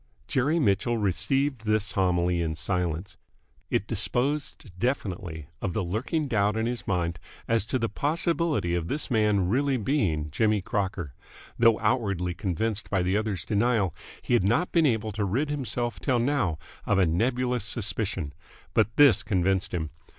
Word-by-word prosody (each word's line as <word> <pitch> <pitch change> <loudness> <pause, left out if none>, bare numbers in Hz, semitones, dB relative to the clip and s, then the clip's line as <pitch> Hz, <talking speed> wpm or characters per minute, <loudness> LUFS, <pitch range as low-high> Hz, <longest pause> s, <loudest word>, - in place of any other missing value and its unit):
Jerry 145 +6 +1
Mitchell 115 - +2
received 110 +6 0
this 110 -2 +2
homily 90 -2 +1
in 80 -1 -2
silence. 85 +1 -2 0.5
It 95 - 0
disposed 125 +3 -1
definitely 95 - -2 0.2
of 90 - -2
the 110 - -1
lurking 125 - -1
doubt 105 -3 +1
in 110 - 0
his 120 0 -3
mind 85 -3 -1 0.3
as 115 -2 +1
to 130 - 0
the 115 -2 0
possibility 160 - 0
of 85 -2 -1
this 145 - -2
man 105 -5 +2
really 135 +6 +1
being 95 - 0
Jimmy 110 +4 +2
Crocker. 95 -6 -3 0.5
Though 115 -2 +5
outwardly 100 -6 0
convinced 100 +4 -2
by 95 -3 +1
the 90 +2 +1
other's 105 -5 -1
denial, 105 -4 +1 0.3
he - - -1
had 120 - +4
not 120 - +1
been 165 -3 +4
able 110 -3 0
to 105 +1 -2
rid 130 +10 0
himself 120 -4 -2
till 130 -4 +1
now 120 - +1 0.3
of 100 - +3
a 95 - +4
nebulous 125 +7 0
suspicion. 100 -8 -1 0.4
But 110 +3 +2
this 135 -9 +7
convinced 95 -1 0
him. 80 -4 -3
105 Hz, 160 wpm, -27 LUFS, 90-125 Hz, 0.5 s, this